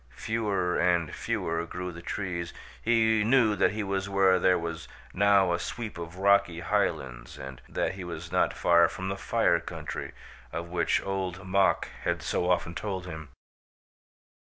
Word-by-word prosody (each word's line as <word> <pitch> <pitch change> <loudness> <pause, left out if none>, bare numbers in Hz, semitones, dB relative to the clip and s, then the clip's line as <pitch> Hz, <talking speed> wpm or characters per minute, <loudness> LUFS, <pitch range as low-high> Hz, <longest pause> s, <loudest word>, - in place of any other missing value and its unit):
Fewer 100 -5 0
and 85 -3 +2
fewer 85 0 -2
grew 90 +1 -5
the 85 0 -10
trees. 85 -2 -4 0.3
He 110 -1 +3
knew 115 -2 +4
that - - +3
he 110 0 -2
was 95 0 -2
where 95 -1 +4
there 90 +1 +4
was 85 -1 -5 0.3
now 100 -2 +4
a 85 - 0
sweep 110 +2 -5
of 85 0 -7
rocky 100 -3 +3
highlands - - -1
and 65 -1 -8
that 85 - -1
he 95 -1 -7
was 85 -1 -7
not - - +2
far 85 -1 +4
from 95 +1 -5
the 95 - -2
Fire 100 - +2
Country, - - -6 0.4
of 85 0 -5
which 85 -1 +1
Old 95 -1 -3
Mok 95 +1 +2 0.2
had - - -1
so 90 - 0
often 85 -2 +1
told 95 -2 -4
him. 80 -4 -8
90 Hz, 160 wpm, -28 LUFS, 85-100 Hz, 0.4 s, knew